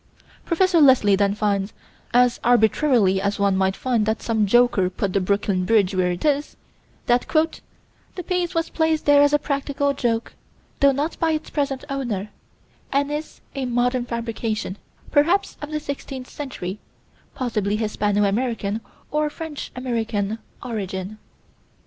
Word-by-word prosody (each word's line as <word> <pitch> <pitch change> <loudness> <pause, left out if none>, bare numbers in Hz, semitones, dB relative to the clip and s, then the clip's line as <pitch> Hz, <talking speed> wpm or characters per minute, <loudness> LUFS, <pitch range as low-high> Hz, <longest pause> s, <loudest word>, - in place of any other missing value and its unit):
Prof. 370 +2 +2
Leslie 260 - +6
then 200 0 +1
finds, 200 -1 -1 0.4
as 245 0 +3
arbitrarily 230 -4 +3
as 200 +1 -1
one 200 -1 +2
might 190 0 +1
find 235 -5 0
that 220 +1 0
some 220 -3 +1
joker 240 -4 +4
put 190 0 -3
the 195 - +2
Brooklyn 200 0 0
Bridge 200 -1 +3
where 185 -1 +1
it 175 - -4
is, 290 0 0 0.5
that 245 0 +2 0.9
"the 360 - -5
piece 360 -1 -1
was 330 0 -1
placed 320 -1 +1
there 290 0 +6
as 290 0 +5
a 295 - +5
practical 280 0 -1
joke, 235 -4 -1 0.5
though 280 0 +6
not 290 +4 -2
by 325 -1 +2
its 310 - -4
present 280 -3 -2
owner; 235 -7 -3 0.6
and 280 +1 +1
is 300 +1 -5
a 270 -2 -3
modern 245 +1 +1
fabrication, 230 -4 -3 0.3
perhaps 340 +7 +2
of 295 - -6
the 305 0 -2
sixteenth 275 -3 -6
century, 210 -9 -6 0.6
possibly 210 -5 -1
Hispano 210 -1 0
American 220 0 -1 0.3
or 300 0 +1
French 310 -1 -7
American 225 -4 -2 0.2
origin." 205 -3 -5
240 Hz, 145 wpm, -23 LUFS, 205-285 Hz, 0.9 s, Leslie